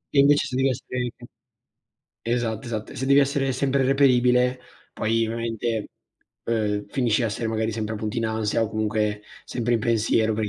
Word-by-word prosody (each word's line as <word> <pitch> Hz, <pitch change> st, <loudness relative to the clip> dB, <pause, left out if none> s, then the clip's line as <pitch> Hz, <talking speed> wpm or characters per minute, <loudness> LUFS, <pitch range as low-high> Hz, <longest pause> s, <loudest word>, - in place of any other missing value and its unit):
E -, -, +6 dB
invece 145 Hz, +1 st, +5 dB
se 125 Hz, -, -5 dB
devi 135 Hz, +1 st, +2 dB
essere 125 Hz, -1 st, -3 dB, 1.1 s
esatto, 115 Hz, -2 st, -1 dB
esatto. 110 Hz, -2 st, -5 dB
E -, -, -11 dB
se 130 Hz, -, -3 dB
devi 140 Hz, +1 st, +5 dB
essere 140 Hz, -1 st, +2 dB
sempre 135 Hz, +1 st, +1 dB
reperibile, 125 Hz, -2 st, +3 dB, 0.3 s
poi 115 Hz, +1 st, 0 dB
ovviamente, 115 Hz, -1 st, -2 dB, 0.6 s
uhm, 105 Hz, -3 st, -1 dB
finisci 120 Hz, -3 st, +1 dB
a -, -, +2 dB
essere 110 Hz, +1 st, -3 dB
magari 110 Hz, 0 st, -1 dB
sempre 110 Hz, 0 st, -3 dB
appunto 105 Hz, +1 st, -4 dB
in 115 Hz, -, 0 dB
ansia, 110 Hz, 0 st, 0 dB
o 110 Hz, -, -1 dB
comunque 105 Hz, -1 st, -1 dB, 0.2 s
sempre 120 Hz, 0 st, -1 dB
in 115 Hz, -, +1 dB
pensiero 110 Hz, 0 st, +2 dB
per 110 Hz, 0 st, -1 dB
i 105 Hz, -, -2 dB
115 Hz, 175 wpm, -24 LUFS, 110-125 Hz, 1.1 s, E